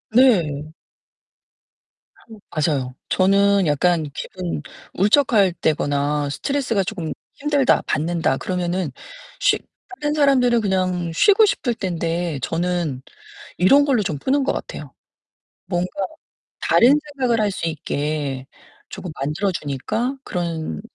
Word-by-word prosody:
네. 160 - +3 1.8
맞아요. 140 -5 -1
저는 200 -1 +3
약간 155 +1 +1
기분 175 0 -5 0.3
울적할 210 -2 +4
때거나 145 -2 0
'스트레스가 255 - -1
조금 175 -5 -4 0.2
힘들다. 285 -2 +2
받는다.' 160 -4 0
그러면은 180 -3 -2 0.5
쉬 - - +3 0.4
다른 295 0 0
사람들은 255 -5 +4
그냥 185 -3 0
쉬고 415 - +5
싶을 250 - -1
텐데 170 -4 -2
저는 170 -5 -1 0.6
이런 275 +11 +6
걸로 255 -7 +2
좀 150 -7 -3
푸는 275 - +1
것 - - +1
같아요. - - -7 0.7
뭔가 180 0 -1 0.7
다른 275 +6 +5
생각을 250 -4 +1
할 205 -1 +1
수 165 - -3
있게 145 -4 -3 0.4
조금 180 - -7
만들어 155 +8 0
주니까 215 - -3
그런 165 - -3
180 Hz, 235 characters per minute, -21 LUFS, 155-230 Hz, 1.8 s, 이런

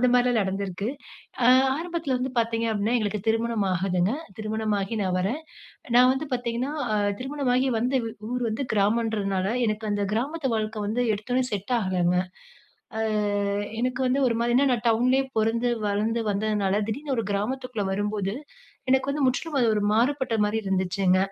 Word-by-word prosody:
அந்த 250 - +4
மாரிலாம் 245 -1 +3
நடந்திருக்கு. 195 0 -3 0.6
அ - - +6 0.3
ஆரம்பத்துல 330 -5 -2
வந்து 255 +1 -2
பாத்தீங்க 230 0 0
அப்பிடீன்னா, 220 +3 +1
எங்களுக்கு 210 -1 -1
திருமணம் 225 -2 +1
ஆகுதுங்க. 185 +2 +1 0.3
திருமணமாகி 215 -1 -1
நான் 185 -1 0
வரேன். 225 +11 -1 0.6
நான் 250 +1 +7
வந்து 285 +4 -3
பாத்தீங்கன்னா, 245 +2 -2 0.2
அ, - - +2 0.2
திருமணமாகி 265 -1 0
வந்து 250 +4 +1
வ் 225 - -5 0.2
ஊர் 250 0 -1
வந்து 220 +5 -2
கிராமன்றதுனால 205 -2 +1 0.2
எனக்கு 215 +1 -2
அந்த 205 0 0
கிராமத்து 275 +5 -1
வாழ்க்கை 215 0 -3
வந்து 230 +4 0
எடுத்தோனே 245 +5 -1
செட் 205 +4 -3
ஆகலங்க. 180 -2 +1 0.8
அ - - 0 0.8
எனக்கு 255 +1 -1
வந்து 255 +2 +2
ஒருமாரி 235 0 +1
ஏன்னா 280 +1 +4
நான் 240 -1 -1
டவுன்லயே 255 +4 +3
பொறந்து, 230 +2 +1 0.2
வளந்து 215 +3 0
வந்ததுனால 205 -1 0
திடீர்னு 280 +5 -2
ஒரு 225 - 0
கிராமத்துக்குள்ள 230 +1 -2
வரும்போது, 205 0 -1 0.6
எனக்கு 265 +1 +3
வந்து 290 0 0
முற்றிலும் 285 +3 -1
அது 235 - +3
ஒரு 205 - 0
மாறுபட்டமாரி 225 -4 +1
இருந்துச்சுங்க. 185 -1 +1
225 Hz, 150 wpm, -25 LUFS, 205-250 Hz, 0.8 s, நான்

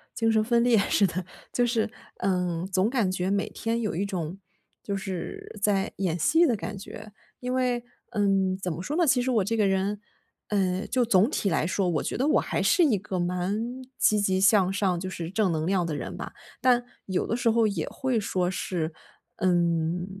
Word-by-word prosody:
精 225 -1 +2
神 220 -1 +3
分 235 +1 +2
裂 245 -2 +4
似 200 0 +3
的 180 0 -2 0.3
就 245 - +2
是， 230 -2 0 0.3
嗯， 180 -2 0
总 190 +2 +1
感 230 -8 +1
觉 185 0 -1
每 200 0 0
天 230 +1 -2
有 215 - -1
一 200 - 0
种， 180 -2 -4 0.4
就 200 - -3
是 190 -2 -5
在 200 -2 +1
演 180 -4 0
戏 325 - +4
的 245 -6 +2
感 210 0 -5
觉。 210 +2 -9 0.3
因 250 0 -2
为， 250 -2 0 0.3
嗯， 195 -2 +2
怎 185 -2 -3
么 160 +2 -5
说 285 +11 -3
呢？ 345 0 +3
其 260 -4 +3
实 255 - -1
我 220 -5 +3
这 225 +4 -1
个 210 -2 +3
人， 195 +2 0 0.5
嗯， 190 -1 0
就 250 -1 +2
总 215 -1 +4
体 205 -9 0
来 160 -1 +1
说， 185 -1 0
我 155 -4 0
觉 - - -3
得 260 - +1
我 305 - +4
还 - - -1
是 355 - +4
一 235 -8 +3
个 190 -1 -4
蛮 200 +8 -2 0.2
积 210 -1 +3
极 190 -2 +1
向 195 -1 +4
上 195 -2 +1
就 185 - -4
是 170 -3 -5
正 195 -1 +1
能 160 +1 -1
量 185 -3 +1
的 160 - -3
人 - - -5
吧。 - - -6 0.3
但 245 -1 +3 0.2
有 185 -2 -1
的 230 - 0
时 240 -1 +2
候 225 -1 +3
也 190 -7 -2
会 260 -2 -1
说 185 -3 -1
是， 170 -3 -2 0.5
嗯， 175 -1 +1
195 Hz, 225 characters per minute, -27 LUFS, 180-230 Hz, 0.5 s, 裂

